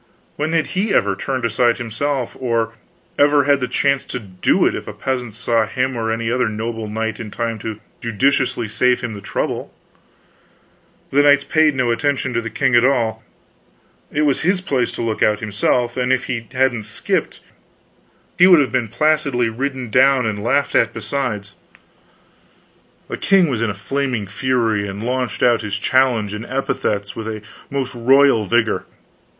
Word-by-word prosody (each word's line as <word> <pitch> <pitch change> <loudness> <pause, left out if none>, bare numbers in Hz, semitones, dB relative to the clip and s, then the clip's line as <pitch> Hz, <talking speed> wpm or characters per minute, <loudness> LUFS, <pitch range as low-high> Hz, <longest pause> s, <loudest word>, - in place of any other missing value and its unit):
When 155 +2 -2
had 165 -2 +2
he 195 +3 0
ever 100 -1 +2
turned 130 +3 -3
aside 115 +1 +2
himself 120 +3 -3
or 115 -3 -1 0.5
ever 145 0 +5
had 140 0 +3
the 125 - -2
chance 140 +2 +1
to - - -5
do 95 -6 0
it, - - +2
if - - -6
a - - -6
peasant 125 -5 -3
saw 115 -2 +1
him 130 +3 -1
or 110 -1 -1
any 115 0 -2
other 125 -2 +1
noble 110 +1 -4
knight 110 +1 -3
in 115 -2 -6
time 115 +1 -3
to 110 0 -6 0.2
judiciously 120 +1 0
save 125 +4 +1
him 120 -3 -4
the 100 - -8
trouble? 100 +1 -3 1.4
The 140 - +4
knights 145 0 +5
paid 155 -1 +2
no 125 -2 +1
attention 130 +1 -1
to 115 - 0
the 115 - -5
king 110 - 0
at 120 - +5
all; 115 -5 +1 0.9
it 150 - 0
was 145 -3 +1
his 185 +3 +2
place 135 -10 -1
to - - -4
look 110 -1 -2
out 105 -1 +3
himself, 115 +3 0
and 125 0 0
if 130 -1 +2
he 115 -3 -4
hadn't 130 -3 +1
skipped 110 0 -2 1.0
he 180 - +8
would 180 -4 +7
have 140 - +1
been 125 -3 0
placidly 140 0 +1
ridden 130 0 -4
down, 130 +1 +4
and 105 -2 -3
laughed 140 +5 +1
at - - +2
besides. 105 -8 -3 1.5
The - - -5
king 190 -4 +3
was 120 -4 -2
in 115 - +1
a 100 - -4
flaming 125 +1 -2
fury, 110 -1 0
and 100 +2 -6
launched 125 +1 -2
out 120 -2 +4
his 105 -1 -3
challenge 120 -3 +1
and 105 +1 -5
epithets 105 -6 -2
with 110 -1 -5
a 110 -1 -5 0.3
most 135 -2 -3
royal 130 -1 +4
vigor. 115 +1 +1
120 Hz, 175 wpm, -19 LUFS, 110-135 Hz, 1.5 s, he